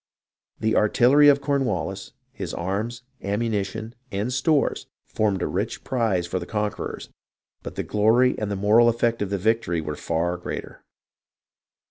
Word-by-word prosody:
The 110 0 +1
artillery 125 +7 +5
of 140 -1 +6
Cornwallis, 110 - -2 0.2
his - - -6
arms, 105 +7 -3 0.2
ammunition, 110 +1 -2 0.2
and 105 +6 -2
stores, 150 +2 +1 0.2
formed 105 -3 0
a - - 0
rich - - -3
prize 110 -9 0
for 90 +1 -2
the - - -7
conquerors; 105 -1 -3 0.5
but - - -8
the - - -2
glory 115 +4 +3
and 105 - -2
the 100 - -1
moral 105 +4 +5
effect 115 -1 0
of 100 - -1
the 100 - -1
victory 105 -4 +1
were 75 -1 -4
far 85 +4 -1
greater. 90 - -7
110 Hz, 145 wpm, -24 LUFS, 95-120 Hz, 0.5 s, of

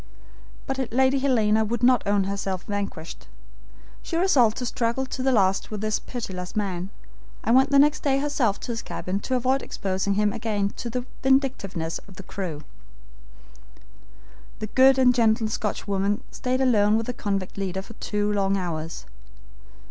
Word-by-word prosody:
But 265 -3 -3
Lady 265 +3 +3
Helena 220 -5 +3
would 235 +2 -2
not 250 -2 +5
own 200 -1 +3
herself 195 -1 -3
vanquished. 200 -5 -5 0.7
She 330 - -3
resolved 265 - +4
to 250 - -3
struggle 235 +2 -1
to 260 - -5
the 265 +1 +2
last 195 -5 +2
with 210 -2 -5
this 215 -1 0
pitiless 185 -7 -6
man, 190 -3 -2 0.5
and 230 - +3
went 265 +1 +5
next 285 +2 +4
day 270 -2 +2
herself 275 -7 0
to 245 - -4
his 230 - -3
cabin 190 +2 -4
to 260 - -2
avoid 260 +2 +1
exposing 195 0 -2
him 210 0 +2
again 210 -3 -1
to 240 - -4
the 250 +1 -3 0.2
vindictiveness 250 - 0
of 190 - -14
the 195 - -9
crew. 170 -6 -5 1.9
The 215 - -4
good 265 0 +6
and 255 -1 +5
gentle 225 -2 +2
Scotchwoman 200 -2 -1
stayed 255 +1 -1
alone 215 -4 +4
with 225 - -2
the 250 - -3
convict 195 -5 -3
leader 190 -1 -3
for 230 - -12
two 210 -1 -1
long 195 -1 +1
hours. 165 -3 -4
215 Hz, 160 wpm, -25 LUFS, 195-255 Hz, 1.9 s, good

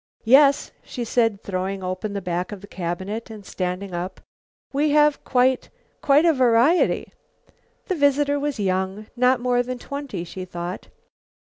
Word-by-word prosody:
"Yes," 275 +4 +5
she 245 - -5
said, 225 -3 +1
throwing 190 0 -3
open 185 +3 -3
the 200 - -4
back 180 +1 -2
of 205 -2 -7
the - - -10
cabinet 190 +5 -4
and 215 -3 -10
standing 185 +1 -4
up, 175 +2 -4 0.5
"we 295 +2 +2
have, 295 0 +3
quite 255 0 +2 0.3
quite 290 +3 +4
a 330 - +5
variety." 255 +5 +3 0.7
The 380 - -1
visitor 285 -2 +2
was 285 -4 -2
young, 190 +1 -1
not 250 +1 +3
more 245 0 +2
than 250 +1 -4
twenty, 275 -8 -6
she 185 +2 -7
thought. 175 +1 -6
225 Hz, 150 wpm, -23 LUFS, 185-275 Hz, 0.7 s, Yes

